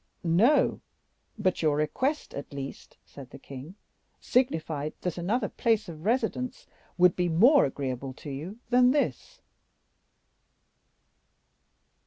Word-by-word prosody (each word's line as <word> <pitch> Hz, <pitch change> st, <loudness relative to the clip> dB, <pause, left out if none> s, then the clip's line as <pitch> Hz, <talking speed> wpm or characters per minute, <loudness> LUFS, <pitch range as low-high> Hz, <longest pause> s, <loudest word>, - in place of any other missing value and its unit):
"No, 200 Hz, -, +3 dB, 0.6 s
but 185 Hz, -4 st, 0 dB
your 155 Hz, -3 st, +2 dB
request, 260 Hz, -, -1 dB
at 140 Hz, -, -7 dB
least," 140 Hz, -1 st, -8 dB
said 135 Hz, -3 st, -12 dB
the -, -, -11 dB
king, 140 Hz, +7 st, -10 dB, 0.4 s
"signified 160 Hz, -, 0 dB
that 180 Hz, -3 st, -2 dB
another 195 Hz, +9 st, -1 dB
place 225 Hz, -4 st, 0 dB
of 160 Hz, 0 st, -9 dB
residence 250 Hz, +2 st, -1 dB, 0.3 s
would 180 Hz, -1 st, +5 dB
be 175 Hz, -1 st, 0 dB
more 240 Hz, -, +6 dB
agreeable 135 Hz, -1 st, -4 dB
to 145 Hz, +2 st, -9 dB
you 160 Hz, +10 st, -6 dB
than 250 Hz, 0 st, +6 dB
this." 290 Hz, -, -2 dB
175 Hz, 115 wpm, -28 LUFS, 145-240 Hz, 0.6 s, more